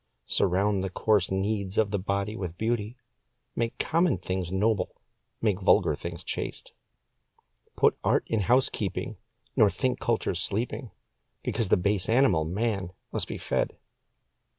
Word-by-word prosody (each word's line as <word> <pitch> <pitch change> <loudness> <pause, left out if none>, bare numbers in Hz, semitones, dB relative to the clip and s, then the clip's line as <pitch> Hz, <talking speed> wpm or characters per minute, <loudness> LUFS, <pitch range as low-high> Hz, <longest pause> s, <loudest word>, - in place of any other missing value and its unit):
Surround 100 +1 +2
the 95 - -2
coarse 105 +1 +2
needs 95 0 -1
of 105 -2 +3
the 100 - 0
body 100 +2 -1
with 90 -5 -5
beauty, 115 +1 -1 0.6
Make 115 0 -1
common 165 - +2
things 90 0 -3
noble, 105 +1 +1 0.5
make 105 -3 +1
vulgar 85 - +4
things 85 +3 -6
chaste. - - -5 1.0
Put - - +3
art - - +3
in 115 - 0
housekeeping, 125 +6 0 0.4
nor 105 - +6
think 130 +4 -1
culture 115 -4 0
sleeping 110 +7 -2 0.5
Because 110 -5 -1
the - - +5
base 100 +1 0
animal, 110 - +4
man, 100 0 -1 0.2
must - - -2
be - - -5
fed. - - -1
100 Hz, 135 wpm, -28 LUFS, 95-115 Hz, 1.0 s, nor